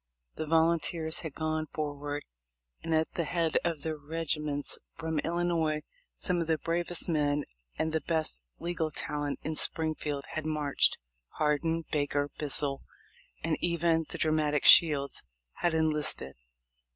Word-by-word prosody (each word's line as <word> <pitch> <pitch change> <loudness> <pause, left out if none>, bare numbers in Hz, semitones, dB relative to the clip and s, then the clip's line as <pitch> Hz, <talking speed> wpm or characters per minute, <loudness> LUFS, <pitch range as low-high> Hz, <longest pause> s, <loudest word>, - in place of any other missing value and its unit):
The 155 - -4
volunteers 160 0 +2
had 160 -4 -6
gone 155 0 -1
forward, 145 -1 -4 0.6
and 165 -1 0
at 160 0 +1
the 170 - 0
head 165 0 +1
of 165 -4 -1
the 160 -1 -1
regiments 150 -1 -2 0.2
from 160 -1 -2
Illinois 165 -2 0 0.3
some 180 -2 +1
of 165 - -2
the 160 -1 +2
bravest 170 +1 -1
men 150 -3 +1 0.3
and 160 0 -1
the 160 - +1
best 160 - +2 0.2
legal 170 -2 -2
talent 145 -1 -3
in 160 - -2
Springfield 150 -3 -1
4iad 155 -1 -2
marched. 150 -2 +2 0.4
Hardin, 160 +2 +1
Baker, 145 -1 0
Bissell, 145 -1 +2 0.6
and - - +1
even 170 -2 +1
the - - -3
dramatic 155 -2 +1
Shields 145 -4 +6 0.4
had 170 -2 +1
enlisted. 150 - +1
155 Hz, 135 wpm, -30 LUFS, 150-165 Hz, 0.6 s, Shields